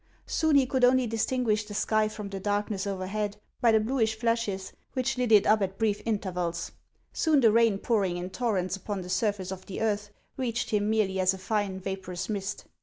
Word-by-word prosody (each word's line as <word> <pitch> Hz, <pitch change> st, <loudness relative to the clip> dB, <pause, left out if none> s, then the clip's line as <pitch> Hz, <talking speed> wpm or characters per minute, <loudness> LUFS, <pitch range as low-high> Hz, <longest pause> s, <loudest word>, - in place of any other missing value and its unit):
Soon 315 Hz, -2 st, +1 dB
he 275 Hz, -2 st, +6 dB
could 255 Hz, 0 st, -1 dB
only 255 Hz, 0 st, +5 dB
distinguish 225 Hz, -1 st, 0 dB
the 210 Hz, -1 st, -9 dB
sky 215 Hz, 0 st, +2 dB
from 215 Hz, -1 st, -6 dB
the 195 Hz, -1 st, -5 dB
darkness 205 Hz, 0 st, -1 dB
overhead 200 Hz, +2 st, -3 dB, 0.2 s
by 235 Hz, -, +5 dB
the 220 Hz, -, +5 dB
bluish 220 Hz, -1 st, 0 dB
flashes 230 Hz, -4 st, -1 dB, 0.2 s
which 255 Hz, -2 st, 0 dB
lit 250 Hz, -2 st, 0 dB
it 210 Hz, -2 st, +7 dB
up 215 Hz, 0 st, +4 dB
at 195 Hz, 0 st, -2 dB
brief 215 Hz, -2 st, 0 dB
intervals; 180 Hz, -5 st, -2 dB, 0.4 s
soon 315 Hz, -3 st, +3 dB
the 230 Hz, -4 st, +5 dB
rain 230 Hz, -2 st, +4 dB
pouring 195 Hz, -5 st, 0 dB
in 180 Hz, +1 st, -5 dB
torrents 190 Hz, -4 st, -1 dB
upon 195 Hz, 0 st, -4 dB
the 180 Hz, -, -8 dB
surface 200 Hz, -2 st, 0 dB
of 190 Hz, 0 st, -7 dB
the 195 Hz, -, -5 dB
earth, 210 Hz, -2 st, 0 dB, 0.3 s
reached 245 Hz, -3 st, -2 dB
him 210 Hz, -1 st, +1 dB
merely 205 Hz, -4 st, +1 dB
as 185 Hz, 0 st, +3 dB
a -, -, -8 dB
fine, 195 Hz, -1 st, -1 dB
vapor 190 Hz, -1 st, -5 dB
ous 175 Hz, -, -4 dB
mist. 200 Hz, -1 st, -3 dB
210 Hz, 200 wpm, -28 LUFS, 190-225 Hz, 0.4 s, it